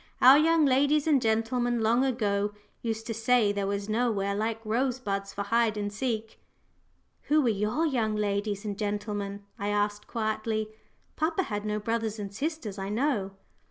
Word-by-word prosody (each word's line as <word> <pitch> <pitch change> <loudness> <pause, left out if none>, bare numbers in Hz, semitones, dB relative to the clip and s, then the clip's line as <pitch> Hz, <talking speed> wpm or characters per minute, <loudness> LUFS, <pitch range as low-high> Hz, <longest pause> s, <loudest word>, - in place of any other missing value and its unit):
Our 265 +3 +8
young 325 0 +4
ladies 285 +2 +3
and 295 -5 +3
gentlemen 230 +2 +1
long 230 +4 +3
ago 210 -5 0 0.3
used 225 -1 -3
to 230 - -3
say 225 -1 +3
there 200 -1 -2
was 200 0 -2
nowhere 215 -3 0
like 220 +2 -1
Rosebuds 220 -4 -1
for 200 - -3
hide 225 +1 +1
and 205 0 -3
seek." 220 -1 -3 0.9
"Who 305 +1 +3
were 260 -5 +3
your 215 +9 0
young 230 -8 0
ladies 205 0 -1
and 205 -1 -4
gentlemen?" 205 -1 -3 0.2
I 200 - -2
asked 205 0 -1
quietly. 220 -1 -2 0.5
"Papa 325 +4 +1
had 205 -7 -4
no 210 0 -1
brothers 225 0 -2
and 200 -2 -6
sisters, 270 - -4
I 195 0 -3
know." 210 -4 0
220 Hz, 160 wpm, -28 LUFS, 205-245 Hz, 0.9 s, Our